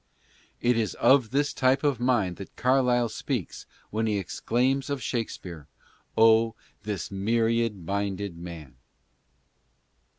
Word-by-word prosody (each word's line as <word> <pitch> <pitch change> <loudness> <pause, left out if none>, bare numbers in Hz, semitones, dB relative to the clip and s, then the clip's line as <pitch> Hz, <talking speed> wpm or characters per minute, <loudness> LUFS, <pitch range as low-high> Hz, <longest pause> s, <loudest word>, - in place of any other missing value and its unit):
It 120 0 +3
is 110 -2 -1
of 125 -1 +4
this 140 +4 0
type 130 +2 +2
of 140 -5 +1
mind 120 -8 +1
that 100 - -10
Carlyle 125 -2 +2
speaks 115 - -4 0.2
when 110 +1 0
he 105 -1 +1
exclaims 125 +8 0
of 140 -1 -1
Shakspere; 90 - -5 0.3
" - - -37
Oh, 115 0 +5 0.3
this 100 -4 -4
myriad 115 -1 0
minded 100 0 -2
mar. 85 -5 -9
115 Hz, 125 wpm, -27 LUFS, 100-125 Hz, 0.3 s, Oh